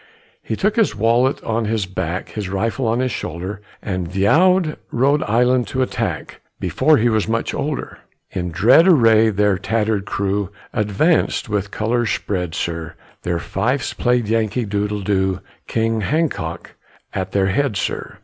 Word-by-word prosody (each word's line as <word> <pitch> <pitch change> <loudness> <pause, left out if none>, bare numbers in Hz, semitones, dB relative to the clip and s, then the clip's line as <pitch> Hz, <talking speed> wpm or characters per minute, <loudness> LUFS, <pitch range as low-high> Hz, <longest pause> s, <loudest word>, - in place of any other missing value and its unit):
He 110 - -3
took 210 - 0
his 225 - +2
wallet 120 +5 +2
on 115 0 -1
his 110 -2 0
back, 90 -1 -4
His 105 -4 -5
rifle 115 +6 -1
on 115 +3 +1
his 130 -1 0
shoulder, 95 +2 -5 0.2
And 90 -4 -3
veow'd 160 - +3
Rhode 140 +4 +2
Island 125 +2 +2
to 130 +5 0
attack 105 - -4 0.2
Before 130 - +3
he 115 - +2
was 110 -3 +1
much 115 +1 -1
older. 150 0 -4 0.3
In 90 -1 -3
dread 115 - +5
array 115 - +5
their 105 -2 +1
tatter'd 105 -1 0
crew 100 -1 -1 0.2
Advanc'd 110 - +1
with 100 -2 -1
colors 115 +2 0
spread, 90 -6 -2
sir, 85 -1 -4 0.3
Their 85 -1 -1
fifes 120 +10 -1
played 125 -2 +1
Yankee 110 +1 0
doodle, 105 0 -2
doo, 95 -1 0 0.3
King 115 -1 0
Hancock 135 - -2 0.4
at 95 -1 -3
their 95 -1 +2
head, 115 +1 0
sir. - - -3
110 Hz, 150 wpm, -20 LUFS, 95-125 Hz, 0.4 s, dread